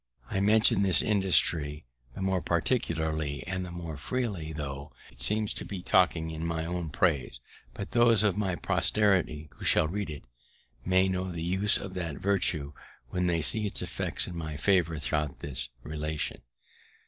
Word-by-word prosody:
I 95 Hz, -, 0 dB
mention 105 Hz, 0 st, +4 dB
this 95 Hz, -2 st, +5 dB
industry 85 Hz, -8 st, +2 dB, 0.3 s
the 95 Hz, -, -5 dB
more 95 Hz, -1 st, 0 dB
particularly 80 Hz, -, -1 dB
and 95 Hz, +1 st, -3 dB
the 90 Hz, -, -7 dB
more 85 Hz, -3 st, -7 dB
freely, 100 Hz, -, -3 dB
tho' 70 Hz, -2 st, -6 dB, 0.2 s
it 65 Hz, 0 st, -9 dB
seems 105 Hz, +8 st, +2 dB
to -, -, -4 dB
be 95 Hz, -3 st, -7 dB
talking 85 Hz, -4 st, +2 dB
in 80 Hz, 0 st, -6 dB
my 80 Hz, -1 st, -2 dB
own 85 Hz, -1 st, -4 dB
praise, 70 Hz, -8 st, 0 dB, 0.4 s
that -, -, -6 dB
those 115 Hz, -3 st, +4 dB
of 100 Hz, -4 st, +2 dB
my 95 Hz, -4 st, -1 dB
posterity, 90 Hz, -8 st, +1 dB
who -, -, -11 dB
shall -, -, +3 dB
read 100 Hz, +2 st, -4 dB
it, 75 Hz, -3 st, -8 dB, 0.6 s
may 95 Hz, +1 st, +3 dB
know 95 Hz, 0 st, -2 dB
the 85 Hz, -1 st, -5 dB
use 95 Hz, +4 st, +3 dB
of 100 Hz, -2 st, -7 dB
that 85 Hz, -5 st, -4 dB
virtue, 85 Hz, -7 st, 0 dB, 0.4 s
when 90 Hz, 0 st, 0 dB
they 85 Hz, -2 st, 0 dB
see 105 Hz, +4 st, +3 dB
its -, -, +4 dB
effects -, -, 0 dB
in 90 Hz, -, -7 dB
my 80 Hz, -3 st, -5 dB
favour 85 Hz, -3 st, +2 dB
throughout 75 Hz, -1 st, -3 dB
this 65 Hz, -3 st, -3 dB
relation. 75 Hz, 0 st, -3 dB
85 Hz, 170 wpm, -28 LUFS, 80-95 Hz, 0.6 s, this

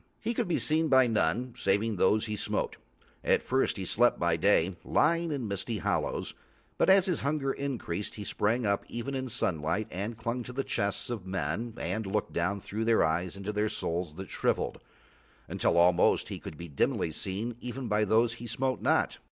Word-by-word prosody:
He 230 Hz, +1 st, -1 dB
could -, -, -1 dB
be 175 Hz, -, +1 dB
seen 160 Hz, +1 st, +2 dB
by 130 Hz, -3 st, +6 dB
none 120 Hz, +2 st, 0 dB
saving 105 Hz, +2 st, +1 dB
those 110 Hz, +4 st, +3 dB
he 105 Hz, -1 st, -3 dB
smote. -, -, -2 dB, 0.5 s
At -, -, +3 dB
first 130 Hz, -3 st, +1 dB
he 95 Hz, -, -4 dB
slept 120 Hz, +7 st, +3 dB
by 85 Hz, -1 st, +2 dB
day, 95 Hz, 0 st, +3 dB
lying 165 Hz, +1 st, +2 dB
in 135 Hz, -6 st, -2 dB
misty 100 Hz, +3 st, -2 dB
hollows, 85 Hz, -, -1 dB, 0.5 s
but -, -, +4 dB
as 190 Hz, -1 st, +7 dB
his 180 Hz, -5 st, 0 dB
hunger 140 Hz, -1 st, 0 dB
increased 120 Hz, -9 st, -3 dB
he 105 Hz, -, -6 dB
sprang 110 Hz, +4 st, 0 dB
up 100 Hz, -1 st, +1 dB
even 120 Hz, +4 st, -4 dB
in 130 Hz, -1 st, -3 dB
sunlight 95 Hz, -2 st, -1 dB
and 105 Hz, +5 st, -4 dB
clung 120 Hz, +2 st, -2 dB
to 125 Hz, +1 st, -8 dB
the 135 Hz, +2 st, -1 dB
chests 100 Hz, +4 st, -2 dB
of 105 Hz, -6 st, -5 dB
men 95 Hz, +6 st, -2 dB
and 110 Hz, -2 st, -2 dB
looked 105 Hz, +2 st, -1 dB
down 90 Hz, +4 st, 0 dB
through 110 Hz, +4 st, -3 dB
their 115 Hz, 0 st, +4 dB
eyes 85 Hz, +4 st, 0 dB
into 100 Hz, +2 st, -4 dB
their 105 Hz, +1 st, +1 dB
souls 85 Hz, -4 st, -3 dB
that 95 Hz, +1 st, -8 dB
shrivelled, -, -, 0 dB, 0.7 s
until -, -, +1 dB
almost 85 Hz, 0 st, +4 dB
he -, -, -5 dB
could 75 Hz, -, -9 dB
be 85 Hz, -, -7 dB
dimly 75 Hz, +2 st, 0 dB
seen 100 Hz, +8 st, -3 dB
even 125 Hz, +1 st, -5 dB
by 105 Hz, 0 st, +2 dB
those 115 Hz, +3 st, +3 dB
he 120 Hz, 0 st, -8 dB
smote 130 Hz, +4 st, -1 dB
not. -, -, +1 dB
110 Hz, 195 wpm, -29 LUFS, 95-125 Hz, 0.7 s, as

